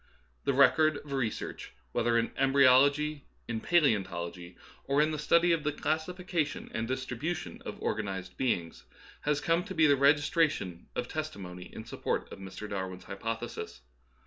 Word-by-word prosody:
The 140 - +2
record 145 +3 +5
of 145 - -11
re 130 -4 +1
search, - - -7 0.2
whether 115 - +2
in 115 0 +1
embryology, 140 +2 +4 0.2
in 115 -2 -3
paleeontology, 90 - +1 0.3
or 140 +1 +2
in 155 +1 +3
the 155 - -3
study 170 +4 +4
of 165 -3 +1
the 150 - +1
classification 160 +1 -2
and 115 +1 -2
distri 130 -1 -3
bution 160 0 -3
of - - -6
organized 95 -4 -3
beings, 90 -11 -2 0.4
has 150 -1 +2
come 165 +3 +1
to - - -6
be 160 -1 +5
the 145 -2 +6
registration 145 - +2
of 125 - -2
testimony 100 - -5
in 110 - -8
support - - -3
of - - -9
Mr. 95 +2 -7
Dar 95 -2 -3
win's 90 0 -9
hypothesis. 110 - -5
135 Hz, 160 wpm, -30 LUFS, 105-155 Hz, 0.4 s, the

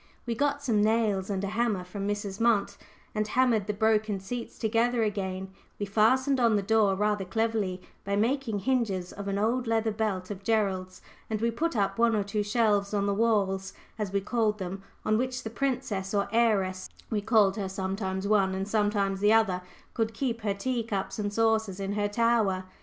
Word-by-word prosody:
We 235 - -1
got 285 +3 0
some 225 -6 +2
nails 215 -3 +1
and 195 -1 -2
a 200 - -1
hammer 215 -3 0
from 195 +2 -5
Mrs. 205 -1 -3
Munt, 230 -4 +2 0.4
and 215 -1 -1
hammered 230 -3 +2
the 210 - 0
broken 215 -1 +1
seats 235 +5 -6
together 230 +1 +1
again; 190 -2 -3 0.3
we 205 - -2
fastened 260 +7 +3
on 230 -3 +4
the 200 - +1
door 210 -1 +3
rather 210 0 0
cleverly 205 -2 -1 0.2
by 200 0 -1
making 225 -1 0
hinges 205 -7 0
of 200 0 -7
an 200 0 -1
old 235 +4 0
leather 225 -1 +1
belt 205 -3 -2
of 200 -1 -6
Gerald's, 195 -4 -1 0.3
and 215 -2 -1
we 230 +1 +1
put 325 +7 -1
up 195 0 0
one 230 -1 +4
or 205 - +1
two 205 +1 -2
shelves 205 -1 +1
on 200 -1 +1
the 200 - +1
walls, 195 -3 +1 0.3
as 205 -3 -2
we 200 0 0
called 215 0 0
them, 190 0 -5 0.2
on 215 +1 +2
which 255 0 -2
the 220 - -5
princess, 215 -7 -2
or 200 0 +1
heiress 200 -5 +1 0.2
we 210 -2 0
called 205 -2 +4
her 195 -2 -2
sometimes 190 0 -3
one, 195 -3 +3
and 190 +1 -3
sometimes 205 -2 +1
the 205 +2 +4
other 195 -5 +3 0.3
could 225 -1 -1
keep 230 -2 -2
her 205 -2 -1
tea 245 +4 -1
cups 195 -3 -3
and 205 -1 -1
saucers 220 -3 +1
in 195 0 -3
her 205 0 0
tower. 210 -3 +2
210 Hz, 195 wpm, -28 LUFS, 195-225 Hz, 0.4 s, on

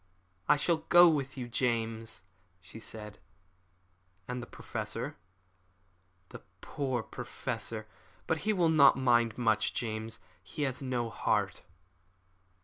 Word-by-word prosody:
"I 150 - +8
shall 165 +3 +1
go 175 +2 +7
with 140 -4 0
you, 125 -2 -4
James," 115 -2 -2 0.4
she - - -11
said. 105 -1 -8 1.1
"And 125 0 -4
the 120 - -8
Professor - - -5 0.5
?" 90 0 -40
"The - - -10 0.2
poor 130 -5 -2
Professor! 110 0 -5 0.4
But 160 - 0
he 215 - 0
will 175 -5 +3
not 140 -4 +6
mind 120 -4 +3
much, 110 -3 +1
James; 110 -1 -3 0.2
he 95 +11 -5
has 135 -1 -2
no 125 -3 -2
heart." - - 0
120 Hz, 125 wpm, -31 LUFS, 110-140 Hz, 1.1 s, I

